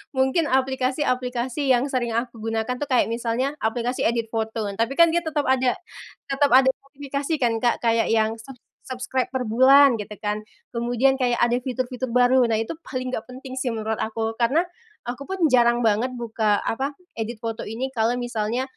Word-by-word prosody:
mungkin 265 Hz, +4 st, +2 dB
aplikasi-aplikasi 260 Hz, 0 st, 0 dB
yang 250 Hz, -1 st, +4 dB
sering 240 Hz, -3 st, -1 dB
aku 235 Hz, -1 st, -3 dB
gunakan 225 Hz, +2 st, -1 dB
tuh, 290 Hz, -, -3 dB
kayak 250 Hz, -3 st, +2 dB
misalnya 235 Hz, +4 st, -1 dB
aplikasi 235 Hz, +3 st, -1 dB
edit 230 Hz, -1 st, -1 dB
foto. 220 Hz, -2 st, -2 dB
Tapi 230 Hz, +6 st, -1 dB
kan 335 Hz, -1 st, +6 dB
dia 345 Hz, -, +2 dB
tetep 310 Hz, -3 st, -2 dB
ada 260 Hz, -1 st, +2 dB, 0.6 s
tetep 285 Hz, +1 st, +3 dB
ada 265 Hz, 0 st, +6 dB
notifikasi 280 Hz, +2 st, -5 dB
kan, 235 Hz, -1 st, +3 dB
Kak, 240 Hz, 0 st, 0 dB
kayak 230 Hz, 0 st, +2 dB
yang 225 Hz, 0 st, +1 dB
ser 265 Hz, +3 st, -11 dB, 0.3 s
subscribe 255 Hz, 0 st, -2 dB
per 255 Hz, -, 0 dB
bulan 260 Hz, +2 st, +6 dB
gitu 210 Hz, 0 st, -6 dB
kan, 210 Hz, +1 st, -3 dB, 0.3 s
kemudian 245 Hz, +3 st, +1 dB
kayak 245 Hz, -1 st, +2 dB
ada 240 Hz, +1 st, +2 dB
fitur-fitur 255 Hz, 0 st, -3 dB
baru. 245 Hz, +1 st, +4 dB
Nah, 225 Hz, -, +1 dB
itu 225 Hz, +5 st, -2 dB, 0.2 s
paling 255 Hz, -1 st, -4 dB
gak 225 Hz, -, -4 dB
penting 260 Hz, +1 st, -8 dB
sih 255 Hz, -, -2 dB
menurut 220 Hz, -1 st, -2 dB
aku. 225 Hz, 0 st, -2 dB
Karena 270 Hz, +9 st, +3 dB, 0.4 s
aku 250 Hz, +3 st, -6 dB
pun 380 Hz, -2 st, -3 dB
jarang 240 Hz, -1 st, +4 dB
banget 230 Hz, +4 st, +1 dB
buka 220 Hz, -3 st, 0 dB
apa, 275 Hz, +5 st, -2 dB, 0.2 s
edit 225 Hz, +1 st, -4 dB
foto 225 Hz, -2 st, -4 dB
ini 255 Hz, +5 st, -4 dB
kalau 230 Hz, 0 st, +1 dB
misalnya, 240 Hz, 0 st, -2 dB
245 Hz, 175 wpm, -23 LUFS, 225-265 Hz, 0.6 s, kan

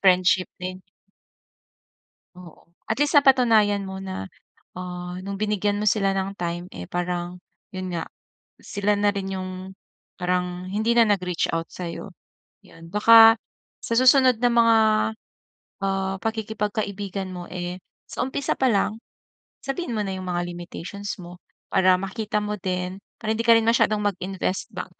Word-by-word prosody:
Friendship 185 Hz, -1 st, +4 dB
din. 185 Hz, +1 st, -6 dB, 1.5 s
Oo. 180 Hz, -3 st, -14 dB, 0.2 s
At 220 Hz, -, 0 dB
least 290 Hz, +1 st, +1 dB
napatunayan 230 Hz, -8 st, +4 dB
mo 190 Hz, 0 st, -6 dB
na, 190 Hz, -, -5 dB, 0.5 s
ah, 180 Hz, 0 st, -6 dB
no'ng 195 Hz, +1 st, -5 dB
binigyan 210 Hz, -1 st, 0 dB
mo -, -, -1 dB
sila 195 Hz, -2 st, +2 dB
ng 195 Hz, 0 st, -1 dB
time, 175 Hz, -1 st, -3 dB
eh, 90 Hz, 0 st, -8 dB
parang 175 Hz, 0 st, -3 dB, 0.4 s
'yon 185 Hz, -1 st, -5 dB
nga 170 Hz, -, -3 dB, 0.5 s
sila 205 Hz, 0 st, 0 dB
na 205 Hz, 0 st, +2 dB
rin 195 Hz, -1 st, -4 dB
'yong 185 Hz, 0 st, -6 dB, 0.5 s
parang 180 Hz, 0 st, -1 dB
hindi 215 Hz, +4 st, 0 dB
na 235 Hz, -2 st, +5 dB
nag-reach 180 Hz, -4 st, 0 dB
out 165 Hz, 0 st, -2 dB
sa'yo. 180 Hz, +2 st, -6 dB, 0.5 s
'Yon, 165 Hz, 0 st, -15 dB
baka 225 Hz, +2 st, +8 dB, 0.5 s
sa -, -, -2 dB
susunod 255 Hz, -2 st, +5 dB
na 245 Hz, -, +3 dB
mga, 230 Hz, -1 st, +5 dB, 1.1 s
ah, 195 Hz, 0 st, 0 dB
pakikipagkaibigan 210 Hz, -3 st, -3 dB
mo, 180 Hz, -1 st, -6 dB
eh, 180 Hz, 0 st, -5 dB, 0.3 s
sa -, -, -3 dB
umpisa 265 Hz, +1 st, -1 dB
pa 265 Hz, -, +2 dB
lang 215 Hz, +1 st, 0 dB, 0.7 s
sabihin 275 Hz, -1 st, -3 dB
mo -, -, 0 dB
na 195 Hz, -, -3 dB
yung 185 Hz, 0 st, -7 dB
mga 175 Hz, 0 st, -1 dB
limitations 175 Hz, +3 st, -6 dB
mo. 175 Hz, 0 st, -10 dB, 0.4 s
Para 185 Hz, -1 st, +5 dB
makita 210 Hz, +2 st, -3 dB
mo 210 Hz, 0 st, -2 dB
din, 185 Hz, 0 st, -3 dB, 0.2 s
para 220 Hz, -1 st, -2 dB
hindi 220 Hz, -, -1 dB
ka 230 Hz, -, +8 dB
rin 225 Hz, -, +1 dB
masyadong 230 Hz, -2 st, +3 dB
mag-invest 190 Hz, -1 st, -2 dB
ba, -, -, -4 dB
195 Hz, 145 wpm, -24 LUFS, 180-215 Hz, 1.5 s, baka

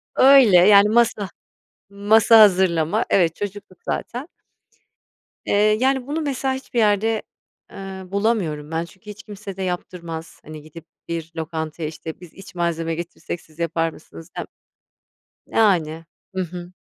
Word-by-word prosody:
Öyle, 260 Hz, -8 st, +7 dB
yani, 200 Hz, +3 st, +7 dB
masa 215 Hz, -3 st, +2 dB, 0.6 s
masa 215 Hz, +3 st, +5 dB
hazırlama. 190 Hz, -1 st, +4 dB
Evet, 170 Hz, -4 st, +2 dB
çocuktuk 205 Hz, -2 st, -7 dB
zaten. 250 Hz, +5 st, -4 dB, 1.2 s
Eee, -, -, -1 dB, 0.3 s
yani, 265 Hz, 0 st, +1 dB
bunu, 305 Hz, +3 st, -2 dB
mesela 270 Hz, -2 st, -1 dB
hiçbir 260 Hz, -2 st, -4 dB
yerde, 215 Hz, +1 st, +2 dB, 0.5 s
ııı, 190 Hz, -1 st, -9 dB
bulamıyorum 195 Hz, -8 st, -1 dB
ben. 165 Hz, +1 st, -2 dB
Çünkü 190 Hz, +4 st, -16 dB
hiç 210 Hz, 0 st, -10 dB
kimse 200 Hz, -2 st, -9 dB
de -, -, -5 dB
yaptırmaz, 170 Hz, -2 st, -6 dB
hani 155 Hz, 0 st, -9 dB
gidip 155 Hz, +2 st, -13 dB, 0.2 s
bir 165 Hz, -1 st, -5 dB
lokantaya, 160 Hz, 0 st, -4 dB
işte, 160 Hz, 0 st, -9 dB
biz 175 Hz, -2 st, -14 dB
iç 195 Hz, -1 st, -14 dB
malzeme 165 Hz, -1 st, -1 dB
getirsek 170 Hz, 0 st, -6 dB
siz 155 Hz, +1 st, -22 dB
yapar 165 Hz, 0 st, 0 dB
mısınız 160 Hz, 0 st, -14 dB
dem -, -, -3 dB, 1.0 s
yani, 165 Hz, -7 st, +1 dB, 0.3 s
hı 190 Hz, -, -2 dB
hı. 175 Hz, 0 st, -8 dB
185 Hz, 135 wpm, -21 LUFS, 165-210 Hz, 1.2 s, Öyle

